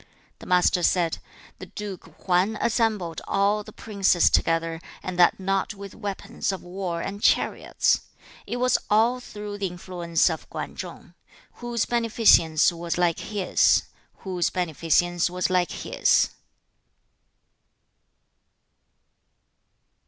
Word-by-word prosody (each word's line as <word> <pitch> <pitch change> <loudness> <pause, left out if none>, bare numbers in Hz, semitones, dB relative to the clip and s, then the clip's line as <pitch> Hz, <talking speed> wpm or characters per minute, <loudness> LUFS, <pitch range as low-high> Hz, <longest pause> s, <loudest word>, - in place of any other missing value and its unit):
The - - -12
Master 180 0 +3
said, 170 -1 +1 0.4
'The - - -9
Duke 205 -3 -7 0.2
Hwan 185 +4 +1
assembled 215 -8 0
all 200 +2 +1
the - - -12
princes 195 -5 +2
together, 165 0 +1 0.2
and 185 -1 -5
that 175 - +5
not 195 +2 -1
with 200 -1 -9
weapons 200 -1 -4
of 190 - -6
war 180 -2 -4
and 200 +1 -6
chariots: - - +2 0.5
it 245 - -3
was 250 +1 +2
all 230 +4 +3
through 210 -3 -8
the 195 - 0
influence 175 -1 -1
of 160 -3 -3
Kwan - - -6
Chung. - - -9 0.5
Whose 240 -2 -1
beneficence 225 -10 +4
was 170 0 -4
like 175 -2 +1
his? 205 -4 +2 0.4
Whose 180 -3 0
beneficence 175 0 +1
was 180 +1 -1
like 180 -1 +2
his?' - - +1
185 Hz, 115 wpm, -25 LUFS, 175-210 Hz, 0.5 s, that